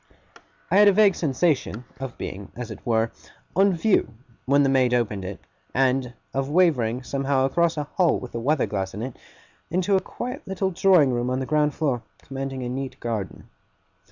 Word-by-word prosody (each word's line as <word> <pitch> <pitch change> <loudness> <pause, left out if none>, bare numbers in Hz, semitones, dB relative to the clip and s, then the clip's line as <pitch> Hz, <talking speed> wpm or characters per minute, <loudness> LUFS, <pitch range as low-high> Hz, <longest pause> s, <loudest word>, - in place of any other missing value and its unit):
I 190 - +4
had 205 0 +7
a - - +8
vague 205 -1 +5
sensation 135 - 0
of 135 -2 -6
being, 95 +1 -7
as 120 -2 -6
it 110 - -9
were, 115 -1 +1 0.4
on 195 +1 +4
view, 175 - +2 0.3
when 140 +2 +4
the - - +3
maid 130 -2 +3
opened 105 -5 -1
it; 95 +1 -6 0.4
and 130 -1 +1 0.2
of 135 0 -1
wavering, 135 -8 +2
somehow, 135 0 0
across 165 +4 +1
a 150 - 0
hall 170 +3 +1
with 125 - -9
a 115 - -3
weather 145 +5 +1
glass 95 -2 -3
in 105 - -4
it, 130 -1 -5 0.5
into 185 +3 +1
a - - +4
quiet 250 +3 -6
little 190 0 -1
drawing 175 -7 +4
room 120 +1 -1
on 130 +1 0
the 130 - -2
ground 150 0 +1
floor, 135 -7 0 0.2
commanding 135 -1 -5
a - - -3
neat 135 +1 -5
garden. 110 -5 -4
135 Hz, 185 wpm, -24 LUFS, 120-165 Hz, 0.5 s, a